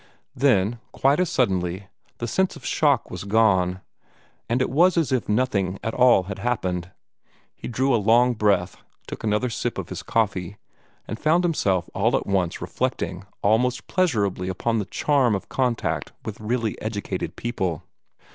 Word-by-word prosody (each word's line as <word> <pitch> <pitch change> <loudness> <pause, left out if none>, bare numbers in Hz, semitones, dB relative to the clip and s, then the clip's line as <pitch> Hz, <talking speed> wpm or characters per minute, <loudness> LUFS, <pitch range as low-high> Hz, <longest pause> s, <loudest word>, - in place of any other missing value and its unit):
Then, 120 -4 +2
quite 140 +4 +2
as 180 -3 +1
suddenly, 95 -5 0 0.3
the 120 - -3
sense 190 +9 0
of - - -12
shock 145 -5 +1
was 90 - -5
gone; 95 -4 +2 0.7
and 120 +2 +1
it 130 - 0
was 175 +6 +4
as 165 -5 +1
if 130 -5 0
nothing 100 -5 +1
at 110 - -2
all 125 -6 +5
had 95 +1 -7
happened. 90 -8 -2 0.7
He - - -8
drew 130 +3 +1
a 115 - +2
long 120 +4 +4
breath, 100 -5 +1 0.3
took - - -8
another 110 +3 0
sip - - -3
of - - -5
his - - -5
coffee, 100 -4 -1 0.5
and 110 - -5
found 165 +3 +3
himself 95 - +1
all 115 +7 +2
at - - -4
once 95 -4 -1
reflecting 90 +2 -3 0.2
almost 120 +5 +2
pleasurably 105 - 0
upon 115 +5 -1
the 105 - -2
charm 130 +1 +2
of 95 - -6
contact 125 -3 -1
with 110 -1 -6
really 115 0 -2
educated 100 -4 -4
people. 95 - -3
110 Hz, 160 wpm, -24 LUFS, 95-125 Hz, 0.7 s, all